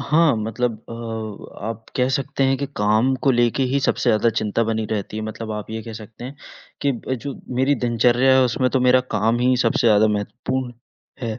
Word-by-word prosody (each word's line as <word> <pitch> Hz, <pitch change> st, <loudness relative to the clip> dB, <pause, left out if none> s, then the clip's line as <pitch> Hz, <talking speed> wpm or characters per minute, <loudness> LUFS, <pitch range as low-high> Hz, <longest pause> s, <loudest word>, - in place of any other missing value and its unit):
हाँ, 155 Hz, +1 st, +3 dB
मतलब 115 Hz, +3 st, -1 dB, 0.2 s
अ, 115 Hz, -2 st, -7 dB
आप 115 Hz, 0 st, -5 dB
कह 125 Hz, 0 st, +2 dB
सकते 135 Hz, 0 st, -1 dB
हैं 135 Hz, 0 st, +2 dB
कि 140 Hz, -, -2 dB
काम 110 Hz, +5 st, +2 dB
को 135 Hz, -, +5 dB
लेके 120 Hz, +1 st, +2 dB
ही 140 Hz, -, +2 dB
सबसे 130 Hz, -2 st, +1 dB
ज़्यादा 110 Hz, +1 st, +3 dB
चिंता 110 Hz, +2 st, 0 dB
बनी 110 Hz, 0 st, -1 dB
रहती 105 Hz, -1 st, -3 dB
है, 110 Hz, -, -3 dB
मतलब 110 Hz, 0 st, -5 dB
आप 105 Hz, 0 st, -6 dB
ये 110 Hz, 0 st, -4 dB
कह 115 Hz, -, -8 dB
सकते 110 Hz, +3 st, -12 dB
हैं 135 Hz, +3 st, -8 dB, 0.5 s
कि 140 Hz, -, +2 dB
ब 130 Hz, +1 st, -4 dB
जो 140 Hz, -, -3 dB, 0.3 s
मेरी 140 Hz, +2 st, +3 dB
दिनचर्या 120 Hz, +3 st, +3 dB
है 130 Hz, -, +5 dB
उसमें 125 Hz, +1 st, +1 dB
तो 130 Hz, -, +1 dB
मेरा 125 Hz, 0 st, +5 dB, 0.2 s
काम 115 Hz, +2 st, +2 dB
ही 125 Hz, +1 st, +3 dB
सबसे 125 Hz, 0 st, +1 dB
ज़्यादा 110 Hz, -1 st, +5 dB
महत्वपूर्ण 125 Hz, +4 st, -3 dB, 0.5 s
है। 110 Hz, -1 st, -4 dB
120 Hz, 205 wpm, -21 LUFS, 110-130 Hz, 0.5 s, को